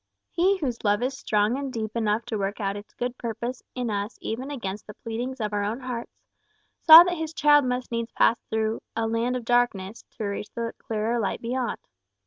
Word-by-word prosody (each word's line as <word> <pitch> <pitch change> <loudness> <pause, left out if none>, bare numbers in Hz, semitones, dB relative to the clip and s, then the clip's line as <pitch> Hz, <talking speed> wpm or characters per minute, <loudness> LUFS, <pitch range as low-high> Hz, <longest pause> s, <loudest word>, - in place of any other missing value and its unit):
He 380 +3 +3
whose 255 -9 -3
love 205 +2 +2
is 260 +2 -1
strong 220 -2 +1
and 275 -2 -4
deep 220 -3 -4
enough 220 0 0
to 230 -2 -3
work 195 +1 -2
out 200 -1 -1
its 205 0 -9
good 245 0 -3
purpose 235 +2 -4
in 245 -3 -2
us 205 +2 -3
even 255 +5 -4
against 210 -8 -5
the 210 - -9
pleadings 245 +4 -5
of 210 -1 -2
our 205 0 0
own 215 +4 -2
hearts, 250 -2 -7 0.6
saw 325 +1 +11
that 355 0 -2
his 320 0 -4
child 295 -2 +5
must 250 0 -2
needs 230 0 -2
pass 230 - +3
through 220 0 -1
"a 225 0 0
land 230 +2 0
of 245 -2 -4
darkness" 230 -4 +1 0.2
to - - -4
reach 205 +1 -3
the 230 0 -3
clearer 225 +2 -1
light 210 - -1
beyond. 245 +1 -2
230 Hz, 205 wpm, -26 LUFS, 215-255 Hz, 0.6 s, saw